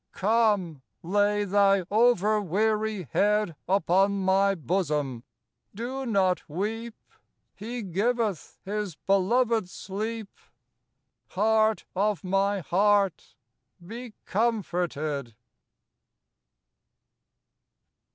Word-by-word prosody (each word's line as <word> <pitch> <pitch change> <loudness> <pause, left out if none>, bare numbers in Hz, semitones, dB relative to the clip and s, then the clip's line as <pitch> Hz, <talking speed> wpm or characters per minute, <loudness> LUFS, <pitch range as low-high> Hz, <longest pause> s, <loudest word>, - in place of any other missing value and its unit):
Come, 205 - +1 0.2
lay 205 +3 +1
thy 195 -1 +3
over 215 -2 +3
weary 215 +2 0
head 210 -4 +1
Upon 195 +1 +3
my 195 +1 +3
bosom! 150 -6 -2 0.5
Do 255 +4 -4
not 190 -5 +2
weep! 220 +7 -4 0.6
"He 235 +3 -6
giveth 205 +1 -1
His 205 -3 -3
beloved 220 +3 +1
sleep." 215 +4 -5 1.0
Heart 220 +2 +2
of 205 +1 0
my 195 +1 +1
heart, 200 +2 +1 0.5
be 230 +2 -8
comforted. 175 - -1
200 Hz, 75 wpm, -27 LUFS, 185-220 Hz, 1.0 s, thy